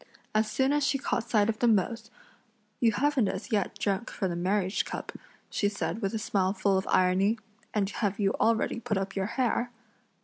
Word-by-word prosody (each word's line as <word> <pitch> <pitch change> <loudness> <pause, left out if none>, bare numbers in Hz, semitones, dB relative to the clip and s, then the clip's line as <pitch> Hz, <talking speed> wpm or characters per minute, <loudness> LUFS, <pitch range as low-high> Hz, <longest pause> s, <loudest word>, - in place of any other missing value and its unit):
As 215 0 +2
soon 265 +5 +2
as 295 0 +2
she 275 0 +2
caught 240 -3 -2
sight 210 -3 +3
of 220 -1 -1
them 235 -2 +5
both: 220 +4 -2 0.7
"You 230 -2 +4
haven't 270 -1 +2
as 195 +7 -4
yet 205 -1 0
drunk 200 +3 -1
from 190 -3 -2
the - - -3
marriage 190 +2 0
cup," - - -6 0.4
she 205 - +1
said 210 +2 -3
with 195 +1 -1
a - - +1
smile 195 -3 0
full 195 0 +1
of 190 - 0
irony, 190 +4 +3 0.3
"and 205 -2 +1
have 205 0 -2
you 195 -1 +3
already 230 +1 +2
put 230 -3 -1
up 195 0 -3
your 195 0 0
hair?" 240 0 0
210 Hz, 200 wpm, -29 LUFS, 195-230 Hz, 0.7 s, them